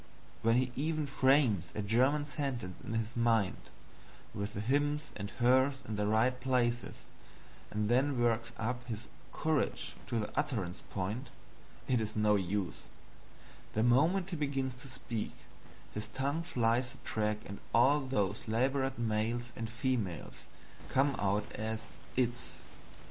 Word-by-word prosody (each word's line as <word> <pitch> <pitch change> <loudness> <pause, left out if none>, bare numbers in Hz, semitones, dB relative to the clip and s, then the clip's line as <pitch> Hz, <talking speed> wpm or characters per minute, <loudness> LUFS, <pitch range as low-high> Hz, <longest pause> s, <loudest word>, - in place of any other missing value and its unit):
When 115 +1 +4
he 125 0 +2
even 155 +2 0
frames 130 - +4
a 105 - -1
German 130 +8 +3
sentence 130 -9 -3
in 115 - -4
his 115 +1 -2
mind, 115 -4 +2 0.6
with 100 +1 -4
the - - -2
hims 145 +6 +1
and 100 0 -4
hers 130 +3 +3
in 110 - -2
the 105 0 0
right 120 +4 +3
places, 120 -2 +1 0.7
and 105 0 -1
then 130 +3 +3
works 115 -1 +2
up 125 +3 -2
his 115 -1 -5 0.2
courage 155 -3 0
to 120 - -1
the 105 -2 -3
utterance 110 -12 -1
point, 105 +7 -3 0.6
it 125 -3 +3
is 110 0 -3
no 105 -1 +4
use 95 -1 -1 0.9
the 110 - +2
moment 165 +10 +4
he - - -1
begins 135 -4 -1
to - - -9
speak 120 -4 -4 0.6
his 105 +1 -3
tongue 135 +7 -1
flies 125 -6 +1
the - - -14
track 105 -1 -1
and 100 - -7
all 135 +5 +5
those 105 -8 -1
labored 130 +4 +1
males 115 +1 -1
and 115 -1 -4
females 120 -7 -2 0.4
come 135 +1 +3
out 100 +1 +1
as 110 +1 -3 0.3
"its." 120 -1 0
120 Hz, 145 wpm, -33 LUFS, 110-135 Hz, 0.9 s, all